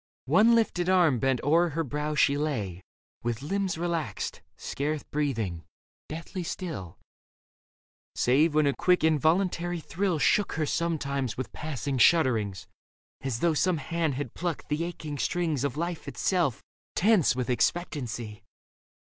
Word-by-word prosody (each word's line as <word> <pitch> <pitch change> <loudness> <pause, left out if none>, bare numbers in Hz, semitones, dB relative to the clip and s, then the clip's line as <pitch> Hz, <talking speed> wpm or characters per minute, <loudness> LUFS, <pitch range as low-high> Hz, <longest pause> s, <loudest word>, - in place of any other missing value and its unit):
One 230 +2 +5
lifted 185 -6 +1
arm 170 -9 +4
bent 135 -1 +1
o'er 170 +4 +4
her 165 +2 -1
brow, 150 +2 -3
she 140 0 +4
lay 110 - -2 0.4
With 120 +2 -3
limbs 195 +2 -1
relaxed, 170 -2 -3 0.2
scarce 150 +1 -3
breathing, 115 - -2 0.5
deathly 170 +4 -5
still; 160 - -5 1.2
Save 150 +5 +3
when 155 -1 +4
a 140 - +3
quick, 180 +2 +2
involuntary 170 +3 +2
thrill 180 +2 -1
Shook 205 +7 +2
her 155 -1 0
sometimes 140 -7 -1
with 130 - -5
passing 140 -3 -3
shudderings. 115 - +3 0.6
As 130 -4 -3
though 170 -2 +3
some 175 +3 +2
hand 160 -2 -1
had 135 -3 -4
plucked 175 -4 -4
the 150 +2 0
aching 155 -4 -6
strings 160 -5 0
Of 140 -1 -2
life 170 0 -3
itself, 175 - 0 0.3
tense 200 - +4
with 125 -2 -2
expectancy. 120 - -2
155 Hz, 135 wpm, -28 LUFS, 135-170 Hz, 1.2 s, One